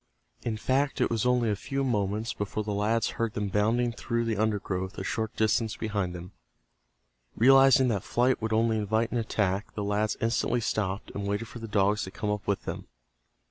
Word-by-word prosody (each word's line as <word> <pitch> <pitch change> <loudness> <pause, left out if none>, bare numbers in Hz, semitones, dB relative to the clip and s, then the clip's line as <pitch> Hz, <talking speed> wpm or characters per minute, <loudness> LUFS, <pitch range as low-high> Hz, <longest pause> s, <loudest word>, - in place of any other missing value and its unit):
In 110 -2 -2
fact 135 +5 0
it - - +2
was 115 +1 +1
only 125 -3 +2
a - - +1
few 135 +7 -3
moments 110 -2 -1
before 105 +1 -3
the 105 0 -3
lads 110 +3 +1
heard 115 -2 0
them 105 -2 -1
bounding 115 +4 +1
through 115 0 -2
the 115 -1 0
undergrowth 100 -3 -1
a - - -4
short 110 -1 -3
distance 110 0 +1
behind 100 -5 -2
them. 90 +2 -8 1.0
Realizing 135 +1 +6
that 100 -5 0
flight 125 +5 +1
would 110 0 -2
only 110 0 +2
invite 110 +2 0
an 120 - 0
attack, 105 -3 -1
the 105 - -2
lads 105 +1 0
instantly 115 +1 +1
stopped 100 -3 -2
and 100 0 -4
waited 100 +3 -2
for 120 - -9
the 115 - -6
dogs 105 0 +2
to - - -7
come 105 +1 -3
up 105 0 -4
with 100 -1 0
them. - - -6
110 Hz, 195 wpm, -28 LUFS, 105-115 Hz, 1.0 s, Realizing